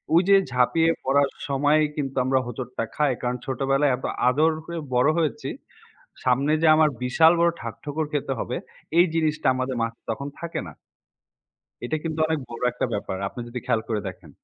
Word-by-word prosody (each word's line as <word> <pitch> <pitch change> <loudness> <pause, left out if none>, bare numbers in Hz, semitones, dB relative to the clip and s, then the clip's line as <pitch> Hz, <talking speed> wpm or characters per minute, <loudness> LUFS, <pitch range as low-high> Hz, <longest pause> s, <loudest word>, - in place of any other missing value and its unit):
ওই 170 - +7
যে 200 - +8 0.2
ঝাঁপিয়ে 125 +7 +3
পড়ার 140 +1 +3 0.2
সময় 145 +3 +3
কিন্তু 135 -2 -3
আমরা 130 0 +3
হোঁচটটা 120 0 -4
খাই। 150 -3 +2
কারণ 125 0 -1
ছোটবেলায় 135 +1 +1
এত 130 - -7 0.2
আদর 155 +5 +3
করে 170 0 -5 0.2
বড় 125 +4 +4
হয়েছি। 160 -4 -1 0.8
সামনে 135 +4 +2
যে - - +5
আমার 155 -1 +4
বিশাল 160 +6 +5
বড় 170 0 +5
ঠাক 115 -1 -5
ঠোকর 150 +1 -2
খেতে 140 -2 -1
হবে, - - -3 0.4
এই 175 - +7
জিনিসটা 155 -1 0
আমাদের 130 0 -2
মাথায় 115 0 -5
তখন 140 +5 -3
থাকে 170 0 -4
না। - - -9 1.1
এটা 155 +6 -1
কিন্তু 160 -1 -3
অনেক 160 -1 0
বড় 120 - -8
একটা 125 - -2
ব্যাপার। 100 -2 -3
আপনি 110 - -9
যদি 120 +1 -5
খেয়াল 115 -3 +1
করে 110 -2 -1
দেখেন। 95 -3 -9
135 Hz, 180 wpm, -24 LUFS, 125-155 Hz, 1.1 s, যে